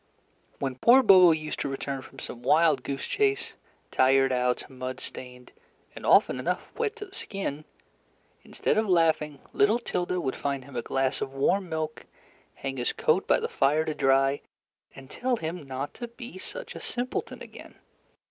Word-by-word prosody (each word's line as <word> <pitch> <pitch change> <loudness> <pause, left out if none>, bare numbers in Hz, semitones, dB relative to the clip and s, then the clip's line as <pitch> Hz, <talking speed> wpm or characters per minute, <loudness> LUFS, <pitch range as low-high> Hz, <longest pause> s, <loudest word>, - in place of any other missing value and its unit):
When 135 -2 -3
poor 255 - +7
Bobo 185 -5 +8
used 155 -1 -2
to 140 - -2
return 135 0 -4
from 135 - -15
some 120 - -8
wild 155 +1 +4
goose 135 +1 -4
chase, 410 -1 0 0.4
tired 135 0 +4
out, 125 -1 0
mud 130 -1 -6
stained, 125 -1 -9 0.4
and - - -6
often - - +5
enough - - -2
wet 455 -2 -1
to 420 -2 -7
the 385 - -19
skin, 175 - -5 0.8
instead - - 0
of 220 - 0
laughing, 160 -4 +2
little 210 +3 +4
Tilda 180 -6 -2
would 135 -6 -2
find 140 -2 -3
him 140 -1 -13
a 120 - -1
glass 135 +2 0
of 135 - -4
warm 180 +7 +1
milk, 155 -1 -4 0.5
hang 135 -1 -5
his 120 - -1
coat - - +1
by - - +4
the - - -2
fire 150 +3 +2
to 155 - -2
dry, 135 0 +2 0.5
and 135 -1 -11
tell 250 - -1
him 165 -6 -5
not 135 +2 -4
to 240 - -6
be 235 -4 -10
such - - -7
a - - -8
simpleton 250 +1 -4
again. - - -12
150 Hz, 175 wpm, -27 LUFS, 135-195 Hz, 0.8 s, Bobo